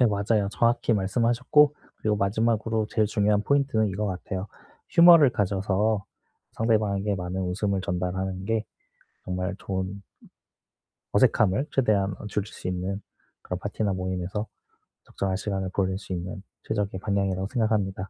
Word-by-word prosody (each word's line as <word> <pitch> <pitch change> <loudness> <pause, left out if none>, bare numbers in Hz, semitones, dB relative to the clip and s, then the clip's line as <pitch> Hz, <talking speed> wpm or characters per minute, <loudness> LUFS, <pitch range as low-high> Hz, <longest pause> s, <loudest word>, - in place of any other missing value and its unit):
네 125 - +6
맞아요. 100 -1 +1
정확히 115 +2 +2
말씀하셨고 120 +8 +3 0.2
그리고 105 -1 0
마지막으로 110 +2 +1
제일 110 -1 +1
중요한 105 0 +2
포인트는 140 -5 +2
이거 100 +2 -2
같아요. 95 +1 -4 0.5
Humor를 170 -5 +9
가져서 100 0 0 0.5
상대방에게 105 -3 +1
많은 90 0 -3
웃음을 95 +2 -1
전달하는 95 +1 -3
게 110 +1 0 0.6
정말 90 +1 -2
좋은 95 +1 -4 1.1
어색함을 105 +6 +3
최대한 100 -7 +2
어 - - -8
줄일 105 0 -2
수 - - -8
있는 90 +2 -3 0.4
그런 90 - -4
파티나 105 +1 -2
모임에서 95 +3 -3 0.6
적정한 95 -1 -3
시간을 95 -1 -2
보낼 95 -1 0
수 95 - -7
있는 90 +3 -5 0.2
최적의 100 -3 -2
방향이라고 95 -2 0
생각합니다. 100 -5 0
100 Hz, 360 characters per minute, -26 LUFS, 95-110 Hz, 1.1 s, Humor를